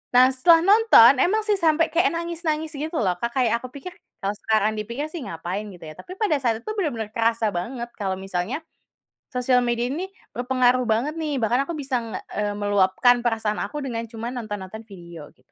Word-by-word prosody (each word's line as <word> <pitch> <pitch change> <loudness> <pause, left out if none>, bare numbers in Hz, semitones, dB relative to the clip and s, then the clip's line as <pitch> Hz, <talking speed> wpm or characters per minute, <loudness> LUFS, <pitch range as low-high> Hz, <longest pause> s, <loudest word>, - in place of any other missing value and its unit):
Nah, 255 +1 +7
setelah 330 +5 +5
nonton, 390 - +7
emang 430 +4 +2
sih 425 - +2
sampai 325 0 +3
kayak 345 +3 +3
nangis-nangis 330 -2 -2
gitu 310 +3 -4
loh, 190 -5 +1
Kak, 235 - 0
kayak 235 -3 +2
aku 255 - -8
pikir 350 +6 -8 0.3
kalau 200 +1 -1
sekarang 215 0 +1
dipikir 235 +7 -4
sih 340 - -6
ngapain 180 +4 -5
gitu 180 - -13
ya, 155 - -8
tapi 365 - -10
pada 400 -9 +2
saat 230 -3 0
itu - - -5
benar-benar 230 - -2
kerasa 230 -1 +1
banget 235 +7 -4
kalau 190 -2 -1
misalnya, 195 +7 -3 0.8
sosial 250 0 +2
media 240 0 0
ini 350 +7 -3
nih - - -26 0.3
berpengaruh 250 0 +2
banget 235 +7 0
nih. 300 -3 -2
Bahkan 245 +5 +1
aku 340 - -3
bisa 270 -4 -1
nge 230 -1 -6 0.2
eee, 210 -1 -1
meluapkan 205 +4 +3
perasaan 220 -2 0
aku 295 -2 -4
dengan 230 -3 -3
cuma 230 0 -5
nonton-nonton 215 -3 -6
video 170 -6 -11
gitu, 130 +1 -34
240 Hz, 195 wpm, -23 LUFS, 215-295 Hz, 0.8 s, Nah